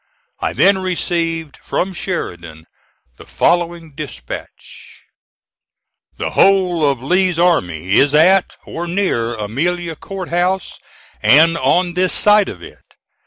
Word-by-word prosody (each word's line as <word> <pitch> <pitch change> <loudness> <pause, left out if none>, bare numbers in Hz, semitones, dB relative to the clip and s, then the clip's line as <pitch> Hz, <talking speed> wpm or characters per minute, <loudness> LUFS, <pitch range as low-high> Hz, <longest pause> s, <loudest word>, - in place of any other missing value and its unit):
I - - -2
then 195 -1 +3
received 165 -4 -2
from 190 +1 -3
Sheridan 85 - -6 0.5
the - - -14
following 170 -2 -1
dispatch: - - -10 1.1
"The - - -3
whole 185 -4 +3
of 130 -3 -3
Lee's 180 +3 +1
army 95 - 0
is 145 +1 +3
at 185 +5 +4
or 170 +1 -6
near 170 -11 -1
Amelia 165 +11 -3
Court 190 +2 -8
House, 180 +2 -1 0.4
and 160 +4 +5
on 175 +1 +1
this 185 +1 +2
side 210 -1 +4
of 90 -3 -10
it. - - -13
170 Hz, 120 wpm, -17 LUFS, 140-185 Hz, 1.1 s, and